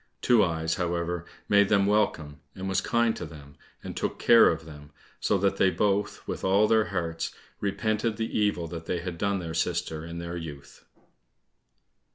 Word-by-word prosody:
Two 120 -4 +5
eyes, 80 -2 -1
however, 85 0 -2 0.2
made 100 -1 +4
them 100 -2 +4
welcome, 90 -8 0 0.2
and 95 0 -5
was 95 -1 +1
kind 115 -1 +1
to - - -6
them, 70 -2 -11 0.3
and - - -6
took - - -2
care 115 - +7
of 80 -1 -3
them, 75 -2 -12 0.3
so 100 - +2
that 100 0 +1
they 95 - +4
both 100 +3 -1
with - - -4
all 100 +3 +4
their 110 -1 +3
hearts 85 -1 -3 0.2
repented 110 +2 -1
the 115 0 -3
evil 105 -5 +1
that 85 0 -8
they 90 - -1
had 85 -2 -6
done 100 -1 +1
their 85 -3 -5
sister 80 -1 -1
in 85 0 -7
their 85 0 -5
youth. 75 -4 -9
90 Hz, 180 wpm, -27 LUFS, 80-105 Hz, 0.3 s, care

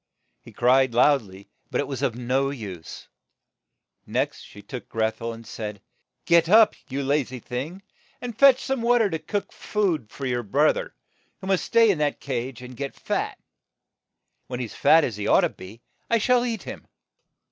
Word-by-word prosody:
He - - -14
cried 130 0 +3
loud 140 +3 +5
ly, 95 -2 -14 0.2
but - - -1
it - - -1
was 135 -2 -5
of 130 -5 0
no 130 +3 0
use. 100 - -8 1.0
Next - - -1
she 105 - -13
shook 125 - -7
Greth 110 0 -1
el, 115 0 -3
and 115 0 -10
said, 105 -2 -6 0.5
"Get 170 -1 +4
up, 215 +1 +7 0.2
you 140 +1 -2
la 140 +2 +2
zy 130 -1 -7
thing, 140 - -6 0.4
and 245 -3 -6
fetch 270 +1 +6
some 270 -3 -1
wa 240 +1 +4
ter 220 -4 +2
to 160 - -2
cook 200 +6 -4
some - - -21
food 175 - -1
for 140 - -7
your 125 -1 0
broth 105 -4 +2
er, - - -6 0.4
who - - -9
must 190 -1 +1
stay 230 -2 +5
in 175 - -2
that 150 -1 0
cage 125 -2 -4
and 125 0 -10
get 140 +2 -5
fat. - - -3 1.1
When 125 -1 -5
he 125 - -2
is 110 - -10
fat 160 0 +5
as 115 -7 -2
he 105 - -3
ought - - +5
to - - +2
be, 105 +6 -13 0.3
I 230 - +4
shall 245 +2 +3
eat 225 -2 -3
him." - - -9
135 Hz, 200 wpm, -25 LUFS, 115-190 Hz, 1.1 s, up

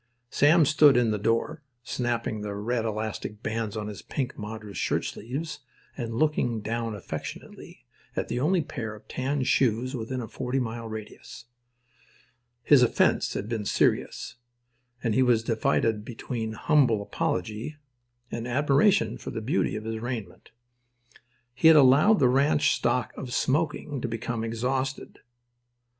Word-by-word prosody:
Sam 155 +3 +5
stood 150 -2 +6
in 120 -2 +3
the 105 - -1
door, 115 +9 0 0.2
snapping 120 -3 -2
the 105 -1 -4
red 115 +3 -1
elastic 110 0 -4
bands 110 -1 -2
on 105 - -3
his 105 -2 -7
pink 130 -3 -4
madras 105 -1 -7
shirtsleeves 145 +7 -3 0.4
and 115 -3 -4
looking 125 -6 +1
down 115 +1 -3
affectionately 100 - -8 0.3
at - - -2
the 120 - -2
only 165 +5 +2
pair 115 -8 -5
of 105 - -16
tan 135 +1 -1
shoes 130 +1 +1
within 125 +2 -4
a 115 - -5
forty 125 +3 -3
mile 115 -2 -4
radius. 110 0 -9 1.2
His 140 0 +6
offence 125 - +2
had 100 - -3
been 110 -2 -2
serious, 105 - 0 0.7
and 115 -3 +1
he 130 - +3
was 120 -3 +3
divided 110 -1 +1
between 110 -1 -5
humble 115 -4 +2
apology 110 - -3 0.5
and 115 +1 -4
admiration 140 - +2
for - - -7
the - - -4
beauty 125 +6 0
of 110 - -5
his 110 0 -4
raiment. 115 -6 -6 1.0
He 130 +5 +3
had 160 -1 +9
allowed 145 +10 +6
the 130 - +4
ranch 145 +3 +3
stock 125 -3 0
of 125 - -7
"smoking" 145 0 0
to - - -2
become 115 0 -3
exhausted. 130 +4 -3
120 Hz, 145 wpm, -27 LUFS, 110-135 Hz, 1.2 s, had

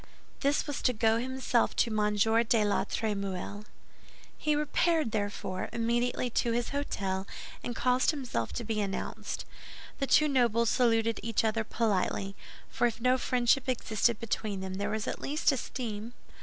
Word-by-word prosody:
This 280 +2 +1
was 290 - -4
to 250 - +2
go 225 0 +2
himself 255 -1 0
to 235 - +2
M. 210 -1 +1
de 225 +1 +3
la 205 - +1
Trémouille. 205 -1 -3 0.7
He 305 -1 0
repaired, 300 -2 +1
therefore, 205 -3 -3
immediately 240 +2 0
to 235 +1 +1
his 240 0 -1
hôtel, 195 -9 -2 0.4
and 240 - -4
caused 250 +1 +2
himself 255 - -2
to 240 - -3
be 220 -1 -1
announced. 195 -1 -4 0.5
The 275 - 0
two 305 - +5
nobles 235 -5 +3
saluted 230 -2 +2
each 225 +1 0
other 220 0 +1
politely, 200 -3 -1 0.3
for 240 +1 +1
if 235 - -4
no 255 +2 +3
friendship 250 +1 +2
existed 230 -2 +1
between 210 -3 -2
them, 190 0 -4
there 200 - -1
was 220 -1 -2
at - - -3
least 300 +2 +2
esteem. 235 -4 -4
230 Hz, 155 wpm, -30 LUFS, 210-250 Hz, 0.7 s, two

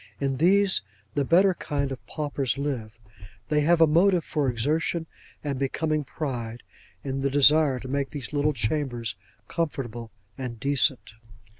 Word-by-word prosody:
In 135 -1 -1
these, 190 +5 +4 0.3
the 145 - +1
better 185 +7 +4
kind 140 -5 -2
of 130 - -6
paupers 140 -5 -2
live. 125 -7 -3 0.5
They 150 -1 +3
have 165 +2 +3
a - - +9
motive 170 +3 +4
for 145 -3 0
exertion 155 +7 0 0.4
and 140 -3 -2
becoming 155 +2 0
pride, 120 -5 -5 0.4
in 135 -1 -3
the 140 - +1
desire 145 0 +5
to 130 - -8
make 140 +1 -1
these 145 -2 -7
little 150 +1 +2
chambers 120 -3 -2 0.3
comfortable 120 -8 -3 0.3
and 120 -3 -5
decent. 140 -1 +1
140 Hz, 145 wpm, -26 LUFS, 130-155 Hz, 0.5 s, a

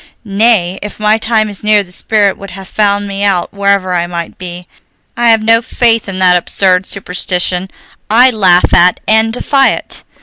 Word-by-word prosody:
"Nay, 200 -3 +1
if 210 +1 -8
my 215 +1 +1
time 220 -1 0
is 205 -1 -6
near 210 -1 +2
the 180 - -17
spirit 205 +1 0
would 200 - -11
have 190 +1 -11
found 205 -1 -1
me 200 0 -4
out 195 -3 -1
wherever 200 -2 0
I 175 -1 -1
might 170 -1 -7
be. 180 -1 -8 0.5
I 240 0 +1
have 225 -1 +3
no 225 +1 +3
faith 230 -3 0
in 190 - -6
that 185 -1 +4
absurd 185 +1 0
superstition 180 -1 -3 0.4
I 245 +4 +5
laugh 185 -6 +2
at 180 +1 +3
and 220 +1 +2
defy 270 +3 +1
it. - - -7
200 Hz, 180 wpm, -11 LUFS, 180-220 Hz, 0.5 s, I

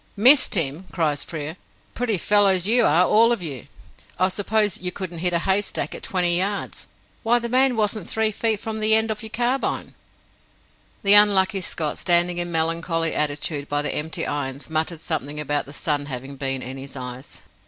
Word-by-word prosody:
"Missed 255 +5 +6
him!" 160 +1 0
cries 150 -5 -1
Frere. 155 +1 -7 0.4
"Pretty 230 -4 0
fellows 195 -1 +3
you 235 +4 +4
are, 170 +5 +4
all 225 +5 +4
of 230 -6 -1
you! 140 -8 -6 0.5
I 185 +1 +2
suppose 205 0 -1
you 180 0 -3
couldn't 180 -3 -7
hit 180 +1 +1
a 170 - +2
haystack 195 +3 -1
at - - -8
twenty 175 -2 0
yards? 200 +2 -4 0.3
Why, 235 +1 +2
the 235 0 -3
man 255 +1 +2
wasn't 210 -3 -1
three 220 -1 +1
feet 220 0 -1
from 220 0 -5
the 215 0 +3
end 220 0 +1
of 215 - -5
your 220 - -6
carbine!" 245 +4 -2 1.1
The 200 0 +7
unlucky 200 -1 +6
Scott, 155 -3 -2
standing 175 0 +1
in 175 0 -2
melancholy 165 0 0
attitude 145 0 -2
by 145 0 -1
the - - -2
empty 155 +2 -4
irons, 140 0 -4
muttered 160 +1 -2
something 150 -2 -4
about 145 -1 -2
the - - -10
sun 145 -1 -2
having 135 +1 -6
been 135 -1 -3
in 130 +2 -7
his 135 +1 -9
eyes. 125 +1 -8
175 Hz, 185 wpm, -22 LUFS, 150-210 Hz, 1.1 s, The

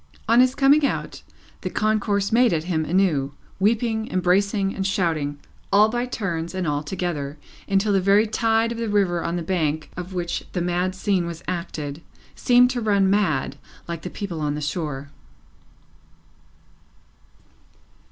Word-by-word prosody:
On 230 +2 +5
his 255 +1 +4
coming 285 +2 +5
out, 280 - -2 0.4
the - - -3
concourse 210 -2 0
made 235 -2 +4
at 155 -1 0
him 160 -3 -1
anew, 155 -6 +1 0.3
weeping, 220 +2 +1
embracing, 195 +2 +1
and 195 0 -2
shouting, 160 -7 -1 0.3
all 210 +2 +6
by 240 +2 -2
turns 175 -7 -3
and 185 -1 -2
all 145 -1 0
together, 150 -3 -4 0.3
until 200 +1 +2
the 195 - +3
very 200 +3 +4
tide 225 +1 +1
of 230 - -5
the 230 -1 -2
river 190 -5 +1
on 170 - -2
the 175 - -2
bank 155 -3 -1
of 180 +1 -6
which 175 -1 -3
the 180 - -1
mad 180 +2 -1
scene 185 -2 0
was 170 -1 -7
acted, 160 -4 -4 0.3
seemed 250 0 +4
to 245 -2 -2
run 200 -3 +3
mad, 155 -9 +1 0.3
like 170 -1 -5
the 180 - -5
people 180 -5 -5
on 145 -1 -1
the - - -3
shore. 145 -2 -4
185 Hz, 155 wpm, -23 LUFS, 165-215 Hz, 0.4 s, all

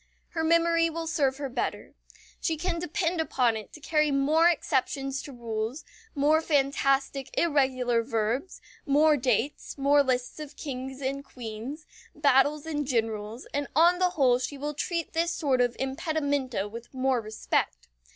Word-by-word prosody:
Her 325 -1 -2
memory 335 0 +3
will 330 0 -4
serve 280 -5 +1
her 285 -1 -3
better. 255 - -4 0.5
She 325 -2 -1
can 340 +1 -2
depend 345 0 -1
upon 250 -7 +1
it 215 -1 -7
to - - -10
carry 305 0 +1
more 300 +5 +4
exceptions 270 -3 -1
to 285 - -9
rules, 230 +1 -4 0.3
more 300 +3 +3
fantastic 275 -2 +1
irregular 260 -7 +2
verbs, 230 - -2 0.3
more 300 +2 +5
dates, 255 +2 -1
more 285 +1 +4
lists 255 0 -1
of 300 -1 -8
kings 265 -1 -6
and 275 +1 -2
queens, 250 +4 -7 0.3
battles 290 +1 +3
and 295 -3 -2
generals, 225 -2 -2
and 285 -1 -1
on 345 +3 +5
the 365 -1 +3
whole 250 -4 +4
she 280 +2 -4
will 295 +2 -3
treat 335 +3 -3
this 335 +1 0
sort 270 -5 +1
of 245 -1 +1
impedimenta 280 - -1
with 230 +3 -10
more 260 -1 +1
respect. 215 - -2
275 Hz, 150 wpm, -27 LUFS, 250-310 Hz, 0.5 s, more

